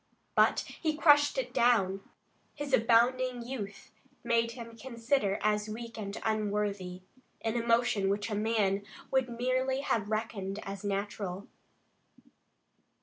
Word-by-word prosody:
But - - +4
he 310 -2 -3
crushed 290 0 +5
it - - -2
down. 195 -5 +3 0.5
His 290 -2 -5
abounding 245 +2 +3
youth 205 -6 -6 0.3
made 230 -1 +1
him 230 -1 -9
consider 230 -3 0
as 210 0 +1
weak 230 +1 -7
and 205 -2 -5
unworthy, 205 -4 -1 0.4
an 225 0 -1
emotion 230 -4 +2
which 205 +2 -1
a - - -1
man 210 -2 +1 0.3
would 265 -2 +2
merely 255 +3 0
have 220 -7 -1
reckoned 215 -3 -2
as 195 0 -6
natural. 200 -1 -3
225 Hz, 120 wpm, -31 LUFS, 205-245 Hz, 0.5 s, crushed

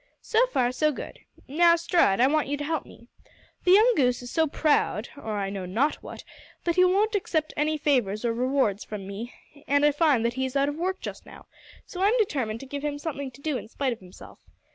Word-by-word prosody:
"So 465 +2 +2
far, 250 - +1
good. 300 +2 -2 0.3
Now, 335 +4 +5
Stride, 335 - +2
I 250 - +6
want 300 +1 +1
you 290 +1 -2
to 290 - -4
help 320 +1 -2
me. 235 - -16 0.6
The 360 - +6
young 445 +5 +6
goose 250 -5 +1
is 245 - -8
so 320 -1 +2
proud, 290 -7 +1
or 220 -7 -5
I 195 -1 -2
know 190 -2 -5
not 245 +11 0
what, - - -9 0.4
that 340 -1 0
he 365 - +5
won't 400 +5 +2
accept 320 -6 -1
any 305 +1 0
favours 245 -8 0
or 230 - +1
rewards 250 -4 0
from 210 -3 -7
me, 205 +5 -7 0.4
and 285 +1 +3
I 295 - +5
find 290 -6 +2
that 235 - 0
he 260 +1 -1
is 260 - -9
out 275 +1 +2
of 290 - -4
work 370 +4 -2
just - - -8
now, - - -13 0.4
so 360 - -7
I'm 420 +5 +3
determined 260 - -1
to - - -8
give 280 +1 -6
him 295 -1 -2
something 285 -3 -5
to 270 +2 -17
do 295 -3 -1
in - - -11
spite 260 +2 -2
of 230 - -12
himself. 185 -1 -14
285 Hz, 230 wpm, -26 LUFS, 240-320 Hz, 0.6 s, I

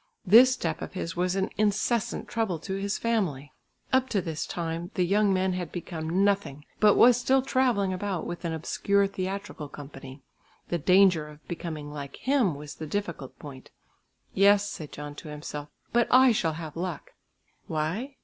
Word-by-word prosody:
This 235 +7 +8
step 170 -11 -2
of - - -6
his 185 -1 -4
was 180 +1 0
an 195 0 -1
incessant 215 +1 0
trouble 220 -7 -1
to 190 +5 -6
his 200 +1 -2
family. 170 - -1 0.4
Up 260 0 +3
to 205 - +1
this 165 -4 -4
time 170 0 -4
the 180 - +2
young 205 +2 +3
man 185 0 +1
had 180 -3 -4
become 170 +1 -2
nothing 160 -8 0
but 210 -1 +6
was 240 0 +7
still 260 +1 +2
travelling 245 -8 +1
about 185 -1 -3
with 175 +1 -6
an 170 - -2
obscure 200 +5 +1
theatrical 195 -5 -5
company. 135 -1 -10 0.5
The 175 - 0
danger 180 -2 +4
of 150 0 -15
becoming 155 -4 -5
like 140 -2 -7
him 255 - +1
was 145 0 -8
the 155 - -7
difficult 170 -7 -4
point. 135 -3 -11 0.6
"Yes," 200 +1 +5
said 155 -7 -7
John 145 0 -7
to - - -9
himself, 150 0 -7 0.2
"but 240 0 +3
I 255 0 +7
shall 165 -7 0
have 155 -2 -7
luck." 175 -2 -5 0.6
Why? 180 - -2
180 Hz, 170 wpm, -27 LUFS, 155-205 Hz, 0.6 s, This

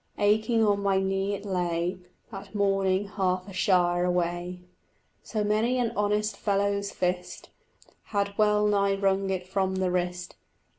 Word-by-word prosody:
Aching 220 +2 +3
on 205 -1 +2
my 195 -1 +2
knee 195 +1 -1
it 200 +1 -9
lay: 180 -1 -1 0.3
That 195 +1 -9
morning 195 -1 +1
half 185 -2 -1
a 195 - -9
shire 175 -2 +2
away 180 0 -1 0.6
So 215 -2 -3
many 215 +4 +1
an 240 -2 0
honest 210 0 0
fellow's 200 0 0
fist 180 0 -3 0.6
Had 200 -1 -2
well 210 0 +3
nigh 200 -1 +2
wrung 195 0 +1
it 185 -1 -3
from 190 0 0
the 185 -1 0
wrist. 180 0 -3
195 Hz, 145 wpm, -27 LUFS, 185-205 Hz, 0.6 s, Aching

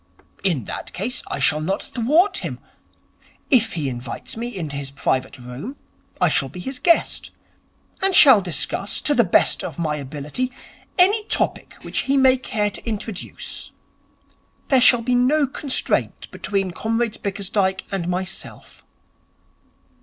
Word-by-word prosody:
'In 170 - 0
that - - -7
case 230 +8 -2
I - - -4
shall 150 0 +2
not 190 +5 -2
thwart 300 - +2
him. - - -5 0.9
If 225 -4 +4
he 155 -5 -2
invites 120 -2 -6
me 230 +2 -3
into 170 -11 -4
his 140 -1 -4
private 135 0 -2
room, 125 - -8 0.4
I - - +4
shall 135 - +1
be 165 - -10
his 260 +8 -5
guest, 340 -1 +2 0.7
and 385 -1 +3
shall 260 -8 +9
discuss, 185 +3 -2
to 295 - +2
the 240 - +4
best 175 - +3
of 155 - -6
my 155 -3 -1
ability, 150 - -3 0.5
any 400 +4 +5
topic - - -1
which - - -2
he 275 +1 +1
may 260 -1 +5
care 210 -5 -1
to - - -8
introduce. 215 -3 -5 1.0
There 265 -2 +5
shall 245 -1 +6
be 250 +2 0
no 270 +5 +3
constraint 270 0 -1
between 195 -3 -2
Comrade 225 +4 -2
Bickersdyke 195 -1 -1
and 190 -3 -2
myself.' 185 +1 -5
205 Hz, 145 wpm, -21 LUFS, 160-255 Hz, 1.0 s, shall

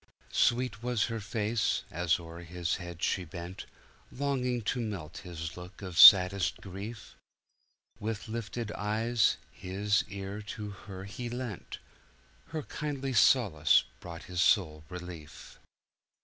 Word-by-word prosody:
Sweet 120 -4 +2
was 120 -3 +1
her 115 - -2
face, 110 +1 0
as 85 +1 +1
o'er 85 0 -9
his 85 0 -2
head 85 -2 -8
she 95 - +1
bent, 85 +2 -8 0.4
Longing 125 -3 -1
to 125 +4 -1
melt 95 -9 -5
his 80 -4 -6
look 90 +3 -10
of 90 -3 -6
saddest 90 0 +8
grief. 100 +4 -8 0.8
With 110 0 -4
lifted 115 0 -4
eyes, 110 +2 +1
his 100 +2 0
ear 100 +1 -6
to 105 0 -6
her 95 -1 -9
he 120 +5 -6
lent; 120 -5 -5 0.7
Her 160 -2 -4
kindly 140 -3 -4
solace 105 - +5 0.2
brought 85 +1 -9
his 90 -1 -2
soul 80 -8 +3
relief. 90 -4 -9
100 Hz, 125 wpm, -30 LUFS, 90-115 Hz, 0.8 s, saddest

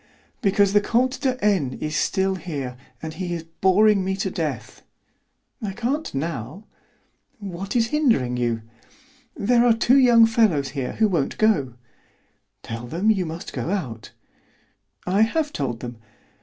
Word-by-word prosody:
"Because 200 -2 +3
the 205 - +5
Comte 255 +5 +1
de 260 -2 0
N. 170 -12 +1
is 155 0 -3
still 190 -1 +1
here, 145 -9 -5 0.3
and 160 0 -5
he 175 +1 -4
is 165 - -6
boring 190 +4 +3
me 190 +1 -1
to 195 - -2
death." - - -4 0.8
"I 205 -3 -3
can't 260 +9 -2
now." 150 - -4 0.7
"What 195 -1 -6
is 225 -2 +2
hindering 230 - +2
you?" 120 -2 -1 0.7
"There 235 +3 +3
are 240 -1 +5
two 250 +4 +4
young 240 -3 +7
fellows 215 -12 +2
here 135 -1 -4
who 220 - +2
won't 170 -8 -1
go." 190 - +2 0.9
"Tell 115 +1 -6
them 175 - 0
that - - +6
you 185 -4 -2
must 165 +2 -7
go - - -3
out." 125 - -4 1.0
"I 190 +3 +2
have 295 +7 +1
told 125 -5 -3
them." 120 -1 -7
190 Hz, 155 wpm, -23 LUFS, 145-225 Hz, 1.0 s, young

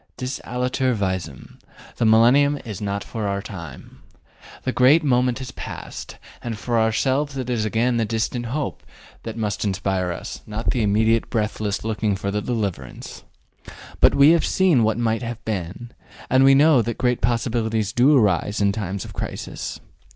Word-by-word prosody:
Dis 130 +1 -4
aliter 125 0 -1
visum: 95 -8 -4 0.4
the 115 - +1
millennium 130 +6 +5
is 105 -4 -6
not 100 0 -2
for 110 -3 -4
our 100 0 -1
time. 85 -9 -10 0.6
The 130 - -1
great 135 +6 +5
moment 125 -3 +2
has 130 -2 -7
passed, - - -8 0.2
and 115 -2 -4
for 120 +1 0
ourselves 135 +6 +1
it 125 -1 -3
is 110 -3 0
again 115 +3 +1
the 115 - +1
distant 115 +2 -2
hope 140 +4 -3 0.4
that 115 0 -7
must 105 -3 -2
inspire 95 -2 -1
us, 85 - -7
not 110 +2 -2
the 125 - 0
immediate 110 +2 +2
breathless 105 -2 -2
looking 110 -2 0
for 100 0 -3
the 105 +1 -1
deliverance. 100 - -4 0.8
But - - +5
we 140 +3 +7
have 170 -1 +3
seen 180 -9 +3
what 110 0 +1
might 115 -1 0
have 120 -1 -6
been, 105 +3 -4 0.4
and 130 +1 +5
we 135 0 +7
know 145 -2 +5
that 115 0 -3
great 125 -1 0
possibilities 115 -3 0
do 135 +4 +5
arise 105 - +1
in 100 -1 +3
times 100 -2 -4
of - - -10
crisis. - - -5
115 Hz, 165 wpm, -22 LUFS, 105-125 Hz, 0.8 s, we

